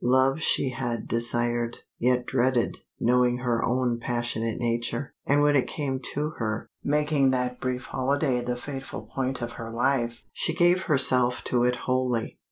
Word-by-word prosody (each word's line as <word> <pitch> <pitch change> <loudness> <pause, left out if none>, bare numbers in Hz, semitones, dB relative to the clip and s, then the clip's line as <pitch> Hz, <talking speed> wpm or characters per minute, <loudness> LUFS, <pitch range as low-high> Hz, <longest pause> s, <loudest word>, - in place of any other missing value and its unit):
Love 130 +4 +3
she 135 - +2
had 120 -2 -3
desired, 120 0 0 0.2
yet 125 0 +2
dreaded, 125 -1 +1 0.2
knowing 125 0 +3
her 120 -2 0
own 125 -1 +1
passionate 120 -1 -1
nature, 120 +3 -1
and 145 +1 +4
when 145 0 +4
it 135 - +3
came 135 -3 -2
to 145 +4 -3
her, 110 -1 -2 0.2
making 150 -2 +2
that 125 -1 -1
brief 130 0 -2
holiday 135 -1 0
the 125 0 -2
fateful 135 +1 -6
point 130 -2 -3
of 120 - -4
her 115 -1 -7
life, 120 0 0
she 165 - -1
gave 175 +1 +4
herself 130 -4 +3
to 120 -1 +1
it 125 0 +2
wholly. 125 -2 -1
125 Hz, 160 wpm, -26 LUFS, 120-135 Hz, 0.2 s, and